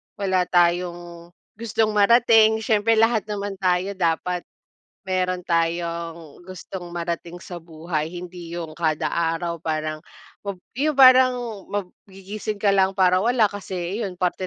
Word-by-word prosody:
wala 185 -3 0
tayong 175 -1 0 0.3
gustong 225 -1 0
marating, 220 +1 +5
siyempre 220 0 +2
lahat 225 0 +3
naman 205 -1 -4
tayo 185 0 +1
dapat 175 0 -1 0.6
meron 185 -1 -1
tayong 170 -2 -2
gustong 185 0 -8
marating 170 0 -5
sa 175 - -8
buhay. 160 -1 -4
Hindi 175 -1 -8
yung 165 -2 -6
kada 155 -1 -1
araw 170 0 -1
parang 155 -1 -3 0.5
mab 200 -1 -3 0.2
yung 300 +1 +1
parang 255 -1 +7 0.3
mag 205 -1 -3 0.2
gigising 200 +2 -6
ka 205 - +4
lang 190 0 +2
para 185 -1 +4
wala, 230 -1 +2
kasi 190 -1 -5
iyon, 195 -5 -3
parte 180 +1 -1
180 Hz, 135 wpm, -23 LUFS, 170-205 Hz, 0.6 s, parang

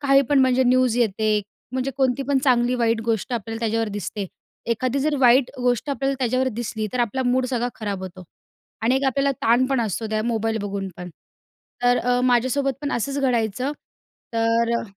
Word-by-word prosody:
काही 275 -1 +4
पण 285 - +5
म्हणजे 260 0 +3
न्यूज 250 -1 +3
येते, 215 -2 +1 0.3
म्हणजे 260 +1 -1
कोणती 265 -1 +1
पण 280 -1 +3
चांगली-वाईट 240 -3 +2
गोष्ट 230 +1 -1
आपल्याला 225 -1 -3
त्याच्यावर 225 -1 0
दिसते. 205 0 -4 0.4
एखादी 255 +4 0
जर 295 +1 +1
वाईट 250 0 +5
गोष्ट 245 +2 0
आपल्याला 275 0 -1
त्याच्यावर 255 +1 +1
दिसली, 220 -2 -3
तर 250 - -1
आपला 240 +3 0
मूड 250 +1 +2
सगळा 245 -1 0
खराब 200 -3 -4
होतो 185 0 -8 0.6
आणि 240 +4 +3
एक 270 - -1
आपल्याला 275 +1 +1
ताण 240 +3 +4
पण 265 -2 0
असतो 220 0 -2
त्या 215 0 0
मोबाईल 225 -1 -1
बघून 200 -1 -4
पण. 180 0 -8 0.7
तर 245 0 +4
अ, 245 0 +1
माझ्यासोबत 260 +3 +2
पण 290 - -2
असंच 275 +4 -2
घडायचं, 250 0 0 0.6
तर 230 0 +1
अ - - -5
245 Hz, 175 wpm, -23 LUFS, 225-260 Hz, 0.7 s, पण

